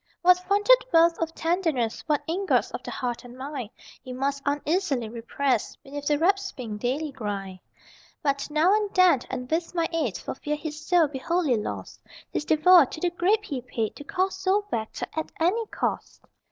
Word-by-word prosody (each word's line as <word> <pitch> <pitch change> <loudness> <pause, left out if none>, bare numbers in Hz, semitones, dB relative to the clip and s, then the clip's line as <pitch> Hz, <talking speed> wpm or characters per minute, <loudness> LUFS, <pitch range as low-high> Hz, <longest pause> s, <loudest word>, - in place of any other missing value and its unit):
What 360 0 +6
funded 415 +7 +4
wealth 330 0 +5
of 325 0 -2
tenderness, 325 -9 0
What 295 -2 +1
ingots 375 +5 +1
of - - -5
the - - -8
heart 245 -2 -3
and 245 0 -12
mind 265 -4 -5 0.3
He 255 - -8
must 275 +2 -1
uneasily 290 - 0
repress 235 +1 -1
Beneath 285 +1 -8
the 295 - +3
rasping 340 - 0
daily 275 +7 -2
grind. 200 -7 -5 0.6
But 280 -1 0
now 310 +6 +3
and 420 -2 0
then, 365 -7 +6
and 250 -1 -4
with 330 +2 -1
my 335 -1 +1
aid, 290 - 0
For - - -5
fear 295 +3 -3
his 300 0 -6
soul 345 -1 +4
be 275 -2 -6
wholly 335 -3 +1
lost, 210 - -5 0.3
His - - -2
devoir 315 0 +6
to - - -8
the 350 +1 0
grape 390 +5 +2
he 270 -4 -4
paid 230 -3 -3
To - - -8
call 375 +3 0
soul 380 +2 0
back, 220 -1 -2 0.3
at 315 - -3
any 410 +8 +1
cost! - - -3
305 Hz, 180 wpm, -26 LUFS, 260-360 Hz, 0.6 s, What